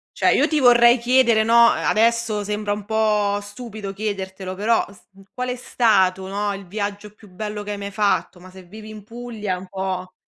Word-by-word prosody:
Cioè, - - +3
io - - +3
ti 310 - 0
vorrei 240 -1 +6
chiedere, 235 -2 +3
no, 235 +1 +6
adesso 225 -1 +1
sembra 210 0 -2
un 205 -1 -7
po' 210 -2 +1
stupido 205 -1 -8
chiedertelo, 190 -2 -5
però 220 +4 +1
s 195 - -19
n 195 - -15
qual 250 0 -4
è 250 - -2
stato, 190 -7 +1
no, 205 +1 -2
il 195 0 -8
viaggio 205 +2 -5
più 210 -1 -18
bello 210 +3 -6
che 210 - -6
hai 205 - -4
mai 200 0 -6
fatto? 200 -2 0
Ma 185 +1 -14
se 185 0 -14
vivi 215 +4 -12
in 215 -2 -10
Puglia 225 -3 -6
è - - -7
un 185 +1 -10
po' 185 -1 -5
210 Hz, 205 wpm, -21 LUFS, 195-225 Hz, -, vorrei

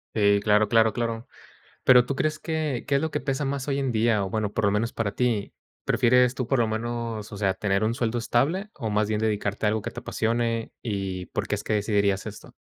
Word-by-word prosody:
Si, 100 -1 +4
claro, 105 0 +3
claro, 110 -1 +4
claro. 115 -1 -3 0.6
Pero, 125 -1 +7
¿tú 140 - -3
crees 155 +2 -1
que 155 -6 -2
qué 140 - +1
es 140 - +2
lo 160 - -2
que - - -1
pesa 135 0 -2
más 140 0 -3
hoy 140 0 0
en 135 -2 0
día? 110 -2 +2
O, 95 - -3
bueno, 105 0 -2
por 110 - 0
lo 100 - +3
menos 115 +3 -1
para 110 -3 -1
ti, 115 -4 -1 0.3
¿prefieres 125 0 +4
tú, 130 -3 -3
por 135 -1 +1
lo 115 - +2
menos, 115 -1 -4
o 105 - -7
sea, 95 -2 +1
tener 100 0 0
un 110 +2 +1
sueldo 120 -1 -1
estable, 145 - 0
o 115 -5 -4
más 105 0 +1
bien 105 - 0
dedicarte 105 -1 -1
a - - +4
algo 110 0 -1
que - - -5
te - - -7
apasione, 115 0 -1
y 95 -4 -3
por - - -3
qué - - 0
es - - -6
que - - -2
decidirías 100 -2 +1
esto? 105 -1 -9
115 Hz, 240 wpm, -25 LUFS, 105-125 Hz, 0.6 s, Pero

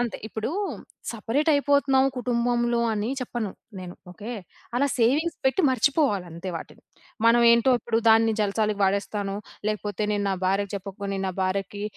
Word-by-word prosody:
అంతే. 245 -2 -2
ఇప్పుడు 220 +2 -4 0.6
సెపరేటైపోతున్నాము 280 +2 +2
కుటుంబంలో 240 -1 +1
అని 210 +1 -1
చెప్పను 240 -4 -3 0.3
నేను. 180 -1 -8 0.2
ఓకే. 215 +5 -8 0.5
అలా 280 +3 +3
సేవింగ్స్ 285 +9 +2
పెట్టి 265 +8 +2
మర్చిపోవాలి 260 - +2
అంతే 170 +3 -7
వాటిని. - - -10 0.4
మనం 235 +1 +6
ఏంటో 235 +3 +4
ఇప్పుడు 225 0 -1
దాన్ని 225 0 +5
జల్సాలకి 210 0 0
వాడేస్తాను, 200 +1 0 0.3
లేకపోతే 210 -1 -3
నేను 205 -1 0
నా 195 - +1
భార్యకి 195 +2 0
చెప్పకు, 195 +1 -9
నేను 195 -1 -2
నా - - -3
భార్యకి 195 +2 -2
225 Hz, 140 wpm, -25 LUFS, 200-245 Hz, 0.6 s, మనం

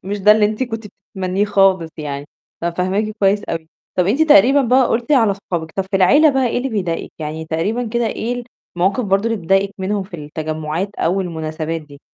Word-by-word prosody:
مش 205 +2 -3
ده 210 +2 +7
اللي 215 -1 +3
أنتِ 215 +4 0
كنتِ 225 -3 -4
بتتمنيه 195 -1 -3
خالص 195 -5 +2
يعني، 145 -2 -5 0.3
ففاهماكِ 185 +5 -1
كويس 200 +1 +2
أوي. 165 -1 -5 0.3
طَب 180 - +3
أنتِ 260 +10 +2
تقريبًا 280 -2 +6
بقى 255 +1 +4
قُلتِ 240 +5 0
على 230 -7 +4
أصحابِك، 175 -5 -4
طَب 195 - 0
في 195 - +2
العيلة 290 - +5
بقى 265 -2 +1
إيه 240 - 0
اللي 265 - -2
بيضايقِك، 180 -8 -3
يعني 155 +1 -5
تقريبًا 170 +10 -1
كده 235 +1 0
إيه 240 +2 -3 0.3
المواقف 195 +8 +1
برضو 195 +1 +1
اللي 225 - -1
بتضايقِك 195 +3 +1
منهم 195 +1 -1
في 185 -2 -9
التجمّعات 155 +4 -4
أو 180 +4 0
المناسبات 160 -2 -4
دي؟ 145 -2 -15
195 Hz, 195 wpm, -18 LUFS, 165-220 Hz, 0.3 s, ده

